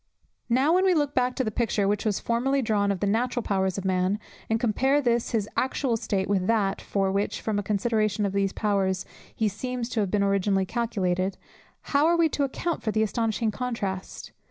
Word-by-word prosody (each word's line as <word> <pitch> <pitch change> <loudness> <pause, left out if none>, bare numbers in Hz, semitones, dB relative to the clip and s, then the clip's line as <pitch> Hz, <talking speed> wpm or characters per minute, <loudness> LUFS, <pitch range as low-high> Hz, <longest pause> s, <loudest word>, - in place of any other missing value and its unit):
Now 265 +7 +3
when 370 +1 +4
we 375 -2 +4
look 290 -2 +1
back 250 0 +1
to 260 - 0
the 215 - -2
picture 210 -3 0
which 205 +1 0
was 210 -3 +1
formerly 265 +4 0
drawn 205 -3 +1
of 190 - -3
the - - +2
natural 240 +4 0
powers 190 -2 0
of 195 - -4
man, 185 +1 +1 0.3
and 225 0 +1
compare 260 +5 +2
this 240 -4 +1
his 215 -3 0
actual 260 -1 0
state 200 -3 -1
with 190 -2 0
that 205 -4 +1
for 195 -1 0
which, 200 +1 -1
from 215 -2 -1
a - - 0
consideration 215 0 0
of 195 - -2
those 195 -1 +1
powers, 195 -3 0 0.3
he 220 - +1
seems 245 +4 -3
to 240 - -2
have 200 -3 +1
been 200 +1 +1
originally 195 -1 +2
calculated, 190 -4 -1 0.6
how 285 +3 +5
are 340 0 +3
we 330 -1 +4
to 290 - -1
account 325 +5 -2
for 220 - -2
the 220 +1 +2
astonishing 225 0 0
contrast! 210 -6 -4
215 Hz, 205 wpm, -26 LUFS, 195-245 Hz, 0.6 s, how